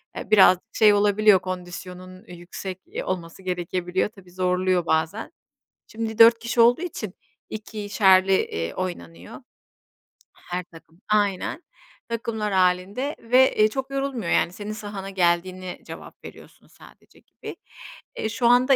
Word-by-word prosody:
eee, -, -, -7 dB
birazcık 195 Hz, +1 st, +5 dB
şey 215 Hz, -1 st, +6 dB
olabiliyor, 205 Hz, -1 st, +4 dB
kondisyonunun 185 Hz, +1 st, -8 dB
yüksek 180 Hz, +2 st, -8 dB, 0.3 s
olması 175 Hz, -1 st, -5 dB
gerekebiliyor. 180 Hz, +1 st, -2 dB
Tabii, 190 Hz, -4 st, -18 dB
zorluyor 180 Hz, -1 st, 0 dB
bazen. 160 Hz, +7 st, -1 dB, 0.6 s
Şimdi 220 Hz, 0 st, -5 dB
4 230 Hz, 0 st, +7 dB
kişi 235 Hz, +1 st, +1 dB
olduğu 240 Hz, +7 st, +5 dB
için 220 Hz, -, -5 dB, 0.4 s
2'şerli, 200 Hz, -3 st, +2 dB
eee, 85 Hz, -, -1 dB
oynanıyor. 85 Hz, -, -6 dB, 1.0 s
Her 180 Hz, 0 st, -6 dB
takım 165 Hz, +1 st, -18 dB
Aynen. 205 Hz, -, 0 dB, 0.5 s
Takımlar 220 Hz, -3 st, -3 dB
hâlinde 190 Hz, +10 st, +1 dB
ve, 255 Hz, +3 st, +3 dB
eee, 215 Hz, 0 st, +5 dB
çok 265 Hz, +3 st, -5 dB
yorulmuyor, 275 Hz, -8 st, -3 dB
yani, 175 Hz, -, +2 dB
senin 205 Hz, +2 st, -7 dB
sahana 205 Hz, -3 st, -7 dB
geldiğine 185 Hz, 0 st, -1 dB
cevap -, -, -11 dB
veriyorsun -, -, -14 dB
sadece, -, -, -19 dB
gibi. -, -, -11 dB, 0.6 s
Eee, 220 Hz, -, -2 dB
şu 235 Hz, +3 st, 0 dB
anda 250 Hz, +3 st, +5 dB
195 Hz, 125 wpm, -24 LUFS, 180-220 Hz, 1.0 s, 4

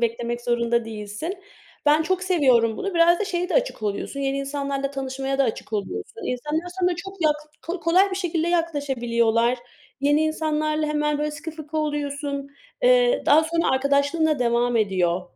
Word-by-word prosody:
beklemek 235 Hz, +1 st, -1 dB
zorunda 235 Hz, -1 st, +1 dB
değilsin. 220 Hz, -, -6 dB, 0.5 s
Ben 300 Hz, +2 st, +5 dB
çok 370 Hz, +2 st, -1 dB
seviyorum 260 Hz, -, +3 dB
bunu. 395 Hz, -2 st, -3 dB
Biraz 340 Hz, +1 st, +5 dB
da -, -, +1 dB
şeye 360 Hz, -2 st, -2 dB
de -, -, -2 dB
açık -, -, 0 dB
oluyorsun; 210 Hz, +7 st, -3 dB
yeni 275 Hz, 0 st, -1 dB
insanlarla 275 Hz, 0 st, -2 dB
tanışmaya 270 Hz, 0 st, -3 dB
da 275 Hz, -, +4 dB
açık 225 Hz, -2 st, -4 dB
oluyorsun. 215 Hz, -, -4 dB
İnsanlar 300 Hz, +7 st, -2 dB
sana 355 Hz, -1 st, +2 dB
çok 390 Hz, +3 st, -7 dB
yak 305 Hz, -1 st, +4 dB, 0.5 s
kolay 365 Hz, +5 st, +4 dB
bir 380 Hz, -, -3 dB
şekilde 340 Hz, -3 st, -1 dB
yaklaşabiliyorlar. 250 Hz, -8 st, +1 dB, 0.4 s
Yeni 290 Hz, +2 st, +3 dB
insanlarla 310 Hz, -1 st, 0 dB
hemen, 300 Hz, 0 st, 0 dB
böyle, 300 Hz, 0 st, -1 dB
sıkı 300 Hz, +2 st, -7 dB
fıkı 310 Hz, -1 st, -8 dB
oluyorsun, 285 Hz, -2 st, -2 dB, 0.3 s
eee, -, -, +4 dB
daha 310 Hz, +3 st, +6 dB
sonra 335 Hz, +1 st, +1 dB
arkadaşlığın 280 Hz, +4 st, +2 dB
da 305 Hz, -2 st, +1 dB
devam 240 Hz, 0 st, +1 dB
ediyor. 185 Hz, -4 st, +1 dB
290 Hz, 160 wpm, -24 LUFS, 245-330 Hz, 0.5 s, daha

